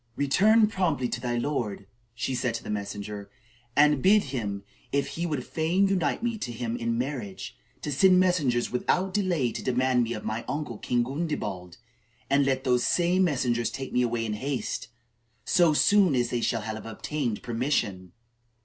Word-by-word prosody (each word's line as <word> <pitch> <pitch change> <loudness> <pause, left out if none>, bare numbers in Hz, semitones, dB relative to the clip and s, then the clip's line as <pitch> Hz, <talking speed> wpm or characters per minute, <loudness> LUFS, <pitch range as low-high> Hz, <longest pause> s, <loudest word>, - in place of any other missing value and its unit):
"Return 210 +11 +4
promptly 175 - 0
to 120 - -4
thy 120 -1 -1
lord," 120 -7 -2 0.3
she 120 +2 -2
said 125 -2 -1
to - - -5
the - - -5
messenger, 100 0 -5 0.5
"and 150 -1 +5
bid 205 +5 +5
him, 100 -5 -3 0.3
if 140 0 0
he 170 +1 -3
would 145 -6 -3
fain 175 +5 +1
unite 185 0 0
me 235 -2 -1
to 125 - -4
him 115 0 -3
in 115 -1 -1
marriage, 125 -6 -4 0.3
to 150 - -2
send 185 +6 +5
messengers 150 -10 +2
without 185 +9 0
delay 175 - +1
to - - -5
demand 130 0 +2
me 120 0 -1
of 105 - -6
my 110 +1 -3
uncle, 145 -7 -4
King 120 -1 +1
Gundebald, 120 - -4 0.5
and 140 0 +4
let 130 -1 0
those 125 -2 +2
same 180 +2 +2
messengers 120 -7 0
take 135 +3 -6
me 125 - +3
away 120 -1 0
in 110 - -2
haste, 130 +3 -3 0.6
so 175 -4 +4
soon 185 +1 +4
as 120 -1 0
they 120 - -1
shall 115 -1 0
have 110 +1 -5
obtained 120 +1 -3
permission." 115 - -1
130 Hz, 175 wpm, -27 LUFS, 115-160 Hz, 0.6 s, and